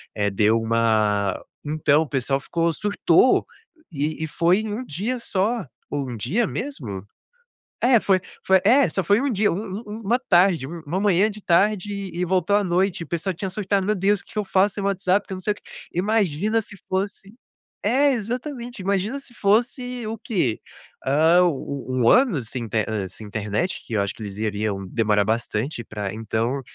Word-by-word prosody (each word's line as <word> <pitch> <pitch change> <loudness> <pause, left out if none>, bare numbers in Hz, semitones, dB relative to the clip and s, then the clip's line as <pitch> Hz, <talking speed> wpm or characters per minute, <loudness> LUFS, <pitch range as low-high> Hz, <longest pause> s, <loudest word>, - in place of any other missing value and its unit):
Eh, 100 -1 +1
deu 105 +3 +3
uma 110 -3 +1 0.2
então, 150 0 +2
o 160 - -2
pessoal 135 0 0
ficou 170 +3 0
surtou, 205 +5 +3 0.5
e 155 +1 -2
e - - -1
foi 175 +6 +2
1 220 +4 -3
dia 225 - -3
só, 220 - -1 0.2
ou 140 -2 -3
1 120 - -5
dia 175 - 0
mesmo? 105 - -5 0.8
É, 245 -1 +6
foi 190 -3 +2 0.2
foi 190 -1 +5
é, 255 +7 +6
só 190 - 0
foi 200 +5 +3
1 280 -2 0
dia, 205 0 +2
um - - -1
um 200 +1 -5
um 210 +2 -7
uma 235 +5 +2
tarde, 180 - +3
uma 165 +3 -4
manhã, 200 +1 +3
de 210 0 -8
tarde, 200 +3 +2 0.2
e 175 - -2
voltou 185 +2 +1
à 210 - +3
noite, 180 -1 0
o - - -14
pessoal 170 +4 -2
tinha 190 +3 -4
surtado: 195 0 0
"Meu 210 - +2
Deus, 200 +1 +2
que - - -19
que 215 - -4
eu 210 - 0
faço 195 +1 +2
sem 200 - -4
WhatsApp, 195 0 +1
que - - -8
eu - - -3
não - - -7
sei 210 - +1
o - - -22
quê". - - -19 0.3
Imagina 205 +1 +1
se 205 -1 -10
fosse 200 +2 -3 0.5
é, 270 +7 +3
exatamente, 245 0 -4
imagina 200 +7 0
se 260 - -14
fosse 240 +3 0
o 225 +1 -4
quê? 180 - -1 0.4
Ah, 160 +6 +4
u 140 -4 -2
u 130 -1 0
um 115 - +5
ano 250 - +4
sem 120 +2 -5
inte 110 -1 0
hã, 105 -4 -3
sem 110 - -11
internet, 105 - -2
que 115 - -5
eu 100 - +2
acho 100 - -3
que - - -11
eles 100 -2 -6
iriam 105 -2 -2
demorar 105 0 +2
bastante 115 +4 -2
pra 105 -3 -5
então, 115 +4 -1
180 Hz, 195 wpm, -23 LUFS, 125-210 Hz, 0.8 s, É